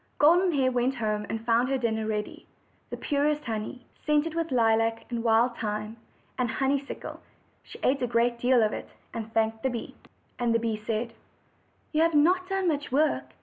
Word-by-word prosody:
Golden 350 +5 +5
Hair 265 -3 +2
went 250 +2 +1
home 215 -3 -2
and 225 0 -4
found 240 +2 +3
her 270 - +1
dinner 220 -3 -1
ready 210 -1 -4 0.4
the - - -5
purest 295 +1 0
honey, 225 +2 -4 0.2
scented 300 +1 +1
with 330 -1 -2
lilac, 225 -2 +2
and 235 -1 -2
wild 235 +1 +3
thyme, 215 0 -3 0.4
and 245 -2 +1
honeysuckles, 275 +3 -2 0.4
and - - -30
she - - -11
ate 270 +1 +2
a 245 - +1
great 235 0 +1
deal 245 -1 +4
of 215 - +1
it, - - -6 0.2
and 225 -1 -5
thanked 220 0 0
the 265 - +1
bee. 235 -2 -5 0.5
And 235 -1 +1
the - - +3
bee 225 -1 -1
said: 230 +1 -2 0.8
"You 310 - +2
have 330 -1 +3
not 365 +5 +3
done 385 -1 0
much 290 -4 -1
work. 300 +4 +1
245 Hz, 190 wpm, -27 LUFS, 225-290 Hz, 0.8 s, Golden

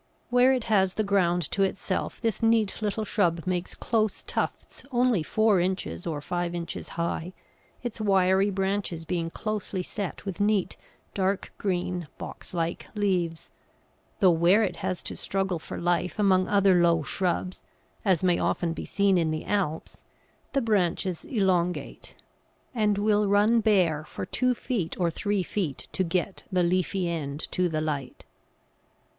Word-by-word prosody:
Where 250 +1 +5
it 255 -3 +1
has 190 -4 +2
the 215 - +1
ground 180 -4 +2
to 195 - 0
itself, 195 0 -1
this 225 -3 -1
neat 225 -2 +2
little 215 +1 -1
shrub 175 -5 +1
makes 180 -1 -2
close 220 -3 0
tufts - - -3
only 245 -6 +3
four 215 +4 +3
inches 175 - -2
or 150 -3 -3
five 175 +2 -2
inches 170 -1 -5
high, 170 +1 -2 0.5
its 235 -2 -4
wiry 195 -1 +3
branches 195 -4 -2
being 170 -1 -2
closely 205 -1 -3
set 200 +1 -5
with 195 -1 -4
neat, 205 -2 +1 0.4
dark 195 0 -1
green, 180 -3 -2
box - - -7
like 170 -1 -2
leaves; 180 -5 -1 0.7
though 185 -2 +7
where 175 +6 +4
it 180 -4 -2
has 185 0 -3
to - - -4
struggle 195 -3 -1
for - - -7
life 175 +2 0
among 190 -3 +3
other 195 -3 +4
low 170 -2 +3
shrubs, 180 +2 -2 0.4
as 190 -4 +2
may 180 -2 +3
often 170 -2 0
be - - -6
seen 200 -2 +2
in 165 -2 +1
the 155 0 -3
Alps, 180 -6 -2 0.5
the 275 - +2
branches 185 -4 0
elongate, 185 -6 -1 0.6
and 210 -4 +2
will 210 0 +2
run 205 +4 +4
bare 185 -8 +2
for - - -6
two 255 -1 +1
feet 205 -10 -3
or 170 -2 +2
three 200 +3 -1
feet 175 -6 -3
to 190 - 0
get 185 +2 -2
the 180 -1 +2
leafy 185 +1 +1
end 150 -3 -3
to 180 -1 +1
the 155 -1 -1
light. 145 -4 -4
185 Hz, 155 wpm, -27 LUFS, 170-205 Hz, 0.7 s, though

